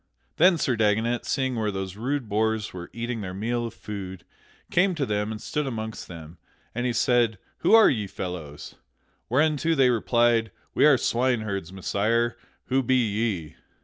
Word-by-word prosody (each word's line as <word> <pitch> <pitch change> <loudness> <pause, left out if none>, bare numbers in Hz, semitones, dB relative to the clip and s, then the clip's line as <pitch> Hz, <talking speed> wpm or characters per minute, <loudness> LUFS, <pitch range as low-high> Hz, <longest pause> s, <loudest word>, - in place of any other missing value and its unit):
Then 175 +1 +6
Sir 130 -5 +1
Dagonet, 110 +2 +1
seeing 130 -2 0
where 110 -2 0
those 95 -2 -4
rude 130 +3 -2
boors 110 +1 0
were 85 -1 -8
eating 115 -1 -4
their 95 -2 -5
meal 120 +4 -1
of 115 - -10
food, 95 -4 -7 0.5
came 180 +1 +3
to 145 -4 -1
them 105 -1 -1
and 110 - -5
stood 150 +4 -2
amongst 110 -3 -5
them. 80 -1 -11 0.3
And 120 +2 -1
he - - +1
said, 120 -2 +2 0.2
"Who - - +5
are 225 - +8
ye 105 -6 0
fellows?" 90 -6 -7 0.6
Whereunto 155 +5 +2
they 130 -3 +4
replied, 120 +1 +2 0.2
"We - - +5
are 140 -3 +6
swineherds, 110 -8 -1
Messire; 115 +5 0 0.3
who 135 +1 +1
be 130 +1 +1
ye?" 105 -8 -1
115 Hz, 165 wpm, -25 LUFS, 100-125 Hz, 0.6 s, are